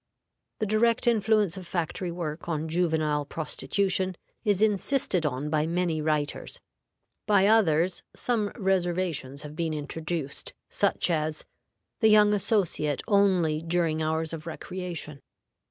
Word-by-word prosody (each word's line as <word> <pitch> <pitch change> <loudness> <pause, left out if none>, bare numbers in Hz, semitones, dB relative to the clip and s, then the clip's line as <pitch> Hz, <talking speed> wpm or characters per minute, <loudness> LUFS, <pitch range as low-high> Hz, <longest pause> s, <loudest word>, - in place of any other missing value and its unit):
The 215 - -1
direct 225 +2 +2
influence 215 -5 +2
of 185 -2 -8
factory 175 +1 -2
work 170 -1 -5
on 160 -1 -1
juvenile 160 -3 +1
prostitution 185 +5 -1 0.3
is 205 -4 +2
insisted 210 - +1
on 145 +2 -3
by 155 0 +1
many 170 -2 0
writers; 150 -1 -2 0.7
by 200 -2 +5
others, 185 -5 +3
some 230 -4 0
reservations 175 - -1
have 150 0 -8
been 160 -1 -1
introduced, 155 0 -4 0.2
such - - +2
as, 155 -1 -1 0.5
The 220 - +5
young 210 -1 +6
associate 185 - 0
only 185 -7 +3
during 165 -1 0
hours 160 +1 -1
of 160 0 -7
recreation. 170 -4 -5
170 Hz, 120 wpm, -27 LUFS, 155-195 Hz, 0.7 s, young